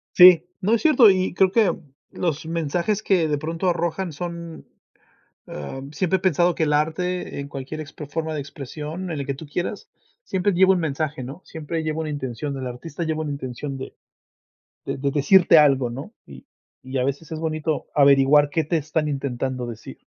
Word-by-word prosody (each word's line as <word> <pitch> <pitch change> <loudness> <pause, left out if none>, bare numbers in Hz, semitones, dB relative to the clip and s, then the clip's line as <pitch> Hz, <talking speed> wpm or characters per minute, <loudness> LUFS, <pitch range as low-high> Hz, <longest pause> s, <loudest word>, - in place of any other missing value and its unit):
Sí, 180 -2 +9 0.2
no, 205 +5 +2
es 230 - +2
cierto 285 -8 +6
y 185 -2 +1
creo 190 +1 +3
que 220 -1 +3 0.4
los 160 -3 -2
mensajes 170 +6 -1
que 180 -6 +2
de 150 -1 0
pronto 165 +4 -2
arrojan 175 +1 -1
son, 170 +1 -7 0.8
ah, 75 - -7
siempre 185 +4 +1
he - - -8
pensado 175 -1 +2
que - - 0
el 150 -1 +1
arte 165 +3 -1
en 140 - -5
cualquier 140 +3 -6
ex 155 0 -10 0.2
forma 160 +1 -3
de 155 - -3
expresión, 150 +5 -6
en 155 - -3
el 140 - -3
que 140 - -2
tú 145 +3 -10
quieras, 175 +7 -4 0.3
siempre 190 - 0
llevo 190 +2 +5
un 185 - 0
mensaje, 150 -3 -2
¿no? 135 +8 -8
Siempre 160 0 -4
lleva 155 0 -2
una 155 - -4
intención, 140 -1 -4
el 130 -1 -4
artista 145 +7 -6
lleva 160 -1 -2
una 150 -2 -3
intención 135 0 -5
de 130 - -8 0.9
de - - -2
de 140 +1 -1
decirte 170 +4 +5
algo, 135 -5 +4
¿no? 135 - -8
Y 70 -2 -13 0.4
y, 130 +1 -4
a - - +1
veces 140 +4 -3
es 155 - -5
bonito 155 -1 -2
averiguar 140 +1 +5
qué 160 +2 0
te 165 +3 0
están 155 0 -1
intentando 130 -2 -3
decir. 115 -2 -9
155 Hz, 190 wpm, -23 LUFS, 140-175 Hz, 0.9 s, Sí